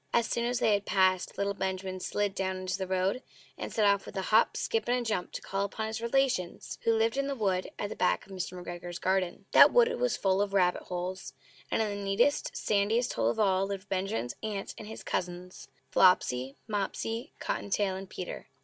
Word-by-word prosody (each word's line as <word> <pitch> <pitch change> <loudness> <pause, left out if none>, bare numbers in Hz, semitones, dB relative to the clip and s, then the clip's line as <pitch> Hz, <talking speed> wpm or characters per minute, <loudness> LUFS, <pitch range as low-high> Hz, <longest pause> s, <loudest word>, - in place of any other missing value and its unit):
As 235 - +4
soon 235 0 -1
as 245 +1 0
they 220 - +3
had 205 0 0
passed, 185 -1 +2
little 200 0 0
Benjamin 190 -1 -3
Bunny - - -8
slid 205 +1 -1
down 190 -1 -2
into 185 0 -2
the 190 - -3
road, 190 +6 0 0.3
and - - -6
set 215 - +2
off 200 -1 +3
with - - -8
a 190 - -1
hop, 220 - +5
skip, 225 -1 -1
and 245 - +3
a 245 - -2
jump 210 -6 -2
to - - -6
call 195 +1 -1
upon 220 +2 -3
his 220 +1 -4
relations, 235 -7 0
who 230 - +3
lived 225 +3 +1
in 275 0 0
the 280 - -2
wood 190 -6 0
at 205 - -2
the - - -6
back - - +1
of 195 - -16
Mr. 185 -1 -4
McGregor's 175 0 -6
garden. 185 -2 -1
That - - +9
wood 480 -1 +5
was - - +1
full 190 0 +2
of 200 -1 -1
rabbit 180 -2 +3
holes; 180 +1 -4 0.4
and 225 - +1
in 205 -2 -2
the 200 - -5
neatest, 205 +9 +1
sandiest 215 +4 +1
hole 115 0 +1
of - - -2
all 195 -2 +3
lived 200 0 -6
Benjamin's 185 - -2
aunt 210 -3 -4
and 215 - -9
his 220 - -8
cousins 180 0 -4 0.2
Flopsy, 135 -8 +3
Mopsy, 225 +4 -3
Cotton - - -3
tail, 195 -1 +1
and 190 0 -7
Peter. 180 - -6
195 Hz, 220 wpm, -30 LUFS, 185-220 Hz, 0.4 s, That